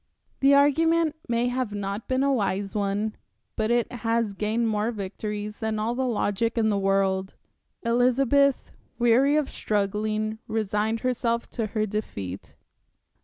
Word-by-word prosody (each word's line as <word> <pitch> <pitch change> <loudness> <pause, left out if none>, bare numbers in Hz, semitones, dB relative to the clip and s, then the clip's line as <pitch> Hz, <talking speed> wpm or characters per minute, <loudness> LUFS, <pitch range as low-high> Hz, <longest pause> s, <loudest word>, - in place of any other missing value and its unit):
The 275 +1 +5
argument 320 +3 +3
may 235 0 +1
not 250 -3 -2 0.3
have - - -40
been 260 +1 +1
a 280 0 +3
wise 200 -4 -1
one, 205 +1 -1 0.4
but 220 0 0
it 240 0 +1
has 230 -3 -1
gained 215 +3 0
more 215 0 0
victories 210 0 -5
than 220 -1 -1
all 220 +2 -1
the 260 +1 -1
logic 225 0 0
in 220 -1 +3
the 205 -2 +1
world. 195 -1 +1 0.5
Elizabeth, 255 +3 +2 0.3
weary 250 +4 +4
of 300 -3 +1
struggling, 215 +1 -1
resigned 215 +1 -1
herself 235 -2 -1
to 225 -3 -2
her 215 - +2
defeat.... 100 - -5
220 Hz, 140 wpm, -26 LUFS, 210-245 Hz, 0.5 s, The